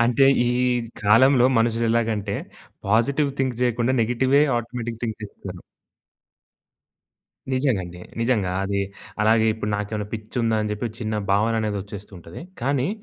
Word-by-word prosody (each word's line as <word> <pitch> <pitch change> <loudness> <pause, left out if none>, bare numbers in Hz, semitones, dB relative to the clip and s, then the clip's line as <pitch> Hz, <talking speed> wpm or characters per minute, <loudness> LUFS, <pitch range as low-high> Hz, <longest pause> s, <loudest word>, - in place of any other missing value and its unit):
అంటే 120 +3 +4 0.2
ఈ - - +2 0.5
కాలంలో 125 +5 +5
మనుషులు 115 0 +1
ఎలాగంటే. 110 -3 0 0.5
పాజిటివ్ 135 +8 +2
థింక్ 130 -3 -1
జేయకుండా 120 0 +1
నెగెటివే 130 +5 +2 0.2
ఆటోమేటిక్ 120 -1 -5
థింక్ 110 -2 -2
చేస్తారు. 95 -3 -9 1.9
నిజంగా 130 -6 +1
అండి. 90 0 -10 0.2
నిజంగా. 115 -6 +1
అది 100 0 -1 0.4
అలాగే 110 +1 +4
ఇప్పుడు 105 -1 -4
నాకేమైనా 105 0 -3
పిచ్చుందా 115 +1 -1
అని 105 - -2
చెప్పి 105 +2 -3
ఒక - - -12
చిన్న 110 -1 -2 0.2
భావన 105 +3 +3
అనేది 105 -1 -2
వచ్చేస్తుంటది. 95 -4 -10 0.2
కానీ 135 +2 0
115 Hz, 130 wpm, -23 LUFS, 105-125 Hz, 1.9 s, కాలంలో